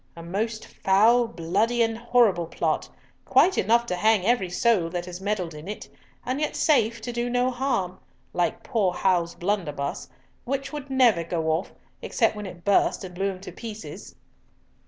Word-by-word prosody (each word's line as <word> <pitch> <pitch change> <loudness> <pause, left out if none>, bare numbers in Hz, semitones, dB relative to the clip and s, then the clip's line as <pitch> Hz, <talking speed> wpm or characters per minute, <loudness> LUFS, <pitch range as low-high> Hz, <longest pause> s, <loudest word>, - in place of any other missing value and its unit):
A 165 - -9
most 220 +6 -3
foul, 225 +5 +3
bloody, 225 +5 +1
and 225 0 0
horrible 230 -7 +2
plot, - - -1 0.3
quite 380 - +4
enough 235 +4 +3
to 180 - -2
hang 210 0 +3
every 220 -5 +2
soul 180 -2 +2
that 175 0 -4
has 180 0 -8
meddled 190 -5 -2
in 150 +3 -10
it, 210 - -6 0.4
and 255 +4 -2
yet 300 - -1
safe 235 -7 +2
to 245 +2 -5
do 240 +1 -1
no 245 +1 +1
harm—like 225 -4 -3
poor 205 -8 +1
Hal's 175 -3 +1
blunderbuss, 170 -7 -2 0.3
which 275 +3 -3
would 290 -2 -6
never 245 -10 +4
go 165 -1 -1
off, 160 +4 -1 0.3
except - - +1
when 210 -1 -6
it 175 -2 -11
burst, 200 0 +2
and 185 -1 -8
blew 195 +2 -1
him 185 -1 -7
to - - -8
pieces." 220 -2 -9
210 Hz, 170 wpm, -25 LUFS, 180-235 Hz, 0.4 s, quite